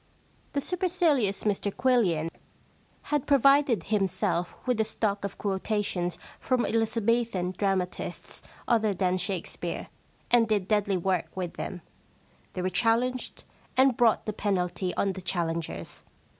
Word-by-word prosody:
The 280 - 0
supercilious 335 - +1
Mr 205 -1 0
Quillian 195 -11 +2 0.8
had 295 -3 +1
provided 275 -3 +4
himself 190 -4 0
with 250 -3 +2
a - - +4
stock 210 -2 -1
of 200 -1 -4
quotations 190 -3 -1 0.2
from 255 -2 +1
Eliza 225 0 0
bethan 205 -5 +1
dramatists 190 -2 -2 0.3
other 220 -4 +2
than 185 0 +1
Shakespeare, 190 -1 -4 0.4
and 235 -2 +5
did 205 -4 0
deadly 205 -2 +2
work 185 +1 0
with 180 -2 -3
them. 180 -3 -5 0.7
They 180 - -3
were 185 - +1
challenged, 245 +3 0 0.3
and 260 -1 +5
brought 230 -2 +3
the 215 - -2
penalty 185 -3 -1
on 195 -1 +1
the 190 - -7
challengers. 170 -2 -3
205 Hz, 130 wpm, -28 LUFS, 185-235 Hz, 0.8 s, and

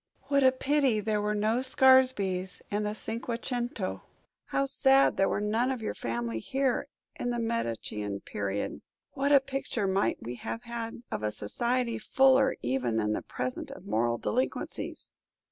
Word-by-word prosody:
What 280 -1 +4
a 260 - +7
pity 265 -3 +2
there 210 0 0
were 210 0 0
no 215 +3 +1
Scaresbys 255 -9 +3
in 205 +1 0
the 210 0 -2
Cinque 230 +2 -3
Cento! 240 -6 -2 0.4
How 275 - 0
sad 270 0 +4
there 195 - +2
were - - 0
none 220 +4 +1
of 255 -4 -3
your - - -2
family 115 -1 -3
here 265 - 0 0.3
in 245 - -1
the 240 - -1
Medician 115 - -2
period! 100 0 -3 0.3
What 280 +1 0
a 280 - +8
picture 270 -5 -3
might 195 +1 +1
we 120 +1 -5
then - - -14
have 230 - -4
had 235 0 -6
of - - -2
a 105 - 0
society 235 - -1
fuller 265 +3 +4
even 125 -2 0
than 105 -1 +1
the - - -2
present 125 0 -4
of - - -10
moral 120 +2 +1
delinquencies." 255 - -3
225 Hz, 165 wpm, -29 LUFS, -, 0.4 s, a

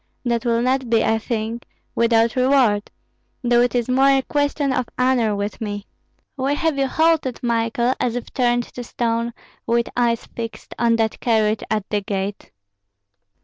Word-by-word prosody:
That 235 0 0
will 235 0 +2
not 260 -1 0
be, 225 -1 +3
I 220 0 +2
think, 225 0 -4 0.3
without 230 -1 +3
reward, 255 -5 +3 0.5
though 240 0 +4
it 245 +1 +1
is 240 -2 +1
more 265 +2 +4
a 270 -1 +3
question 285 -1 0
of 255 -2 -1
honor 250 -4 +2
with 200 +1 -4
me. 205 -1 -4 0.5
Why 275 0 0
have 315 -2 0
you 270 - +2
halted, 315 -4 +1
Michael, 235 +1 +1
as 245 -2 0
if 245 - -6
turned 240 -1 +2
to 245 - -6
stone, 235 0 -1 0.4
with 235 0 +1
eyes 235 -2 +1
fixed 230 -1 -7
on 235 -1 +3
that 225 -1 0
carriage 220 -2 +1
at 215 -2 -1
the 210 -1 +1
gate?" 195 0 -4
235 Hz, 165 wpm, -21 LUFS, 225-255 Hz, 0.5 s, though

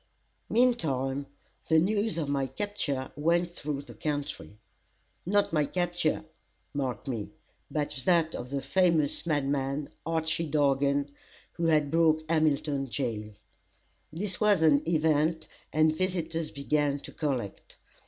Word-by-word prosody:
Meantime, 140 - +1 0.4
the 160 - +5
news 205 +4 +2
of 155 -4 -1
my 140 -1 0
capture 145 -4 -3
went 170 +3 +1
through 145 -4 -4
the - - -12
country; 145 -8 -4 0.7
not 205 -2 +2
my 150 -2 +3
capture, 175 -1 0 0.5
mark 130 -5 -3
me, 115 -6 -3 0.4
but 150 -1 -1 0.2
that 170 -3 +3
of 125 - -6
the 140 0 -3
famous 170 -5 +2
madman, 140 -1 0 0.2
Archy 165 0 -1
Dargan, 140 -1 +2 0.4
who 170 - -1
had 150 -3 +3
broke 160 -1 +3
Hamilton 150 -3 +1
jail. 105 -1 -3 0.8
This 185 +5 -3
was 205 -6 +4
an 145 -3 +5
event, 160 0 +2 0.2
and 155 0 +3
visitors 165 -3 -1
began 145 0 0
to - - -9
collect. 130 -9 -4
155 Hz, 125 wpm, -29 LUFS, 140-165 Hz, 0.8 s, the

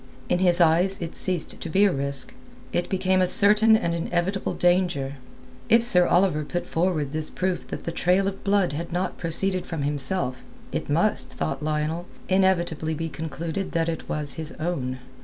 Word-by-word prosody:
In 175 - +2
his 180 -1 +3
eyes 175 +4 +3
it 170 -1 -6
ceased 180 -4 -1
to 165 - -5
be 190 +6 +3
a 200 - +3
risk; 140 -2 -1 0.4
it 175 - -1
became 185 0 +1
a 185 - +3
certain 215 +3 +7
and 170 -7 -2
inevitable 175 +3 -2
danger. 175 -6 +1 0.5
If 230 +1 +5
Sir 180 -6 +5
Oliver 175 -4 +2
put 175 +4 -4
forward 160 -5 -1
this 155 0 -1
proof 185 -1 -3
that - - -6
the 170 - -3
trail 180 +3 +1
of 195 0 -5
blood 200 -6 +1
had 165 +3 -5
not 180 +2 -2
proceeded 185 +3 -1
from 160 -4 -4
himself, 140 -1 -2 0.3
it - - -4
must, - - +1
thought 80 0 -3
Lionel, 155 +3 -2 0.2
inevitably 175 -4 +1
be 165 +1 -4
concluded 160 +5 -5
that 165 0 0
it 160 - -5
was 150 -2 -1
his 160 -1 -6
own. 140 -6 -3
175 Hz, 175 wpm, -24 LUFS, 155-185 Hz, 0.5 s, certain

